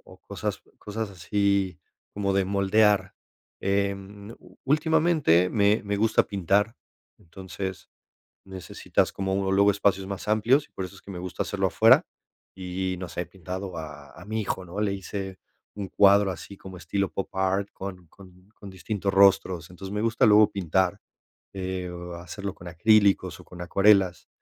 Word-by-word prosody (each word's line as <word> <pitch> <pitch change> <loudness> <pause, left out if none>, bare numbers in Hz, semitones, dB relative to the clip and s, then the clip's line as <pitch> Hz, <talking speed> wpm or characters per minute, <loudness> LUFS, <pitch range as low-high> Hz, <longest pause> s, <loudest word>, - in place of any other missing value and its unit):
o - - -21
cosas - - -4
o - - -27
cosas 105 0 -5
así 100 0 0 0.4
como 100 -1 -1
de 95 -1 +1
moldear, 100 0 +2 0.5
em, 100 +1 -2
ú - - -19
últimamente 150 - +3
me 105 0 +2
me 100 0 -1
gusta 110 +1 +3
pintar, 100 +3 +1 0.4
entonces, 95 0 -7 0.5
necesitas 95 -2 -2
como, 95 -1 -2
uh, 95 0 0
luego 100 +1 +4
espacios 100 -1 +1
más 100 +1 -6
amplios, 120 +8 +3
por 95 - -6
eso 95 - -9
es 95 - -16
que - - -11
me 90 - -6
gusta 90 0 -4
hacerlo - - -1
afuera, - - +5 0.5
y 95 0 -3
y - - -4
no 90 0 -6
sé, 90 - -4
he - - -9
pintado 95 0 -7
a 75 -3 -9
a - - -13
mi 110 +1 -3
hijo, 95 -2 -3
¿no?, 90 +4 -6
le 105 -2 +1
hice 95 -1 -6 0.4
un 100 -2 -5
cuadro 100 0 +5
así 100 +2 -8
como 95 -1 -11
estilo 95 +3 -2
pop 95 - -5
art 95 +1 0
con 95 -2 -8
con 90 +1 -18
con 100 - -11
distintos 100 +1 -3
rostros, 95 -3 +4
entonces, 95 +2 -9
me 105 - -2
gusta 115 +1 +2
luego 105 0 +6
pintar, 95 +1 0 0.5
eh, 95 -1 -4 0.3
hacerlo 100 +3 -6
con 90 - -13
acrílicos 95 0 +3
o - - -14
con 90 - -12
acuarelas, 95 0 +3
95 Hz, 165 wpm, -26 LUFS, 95-100 Hz, 0.5 s, luego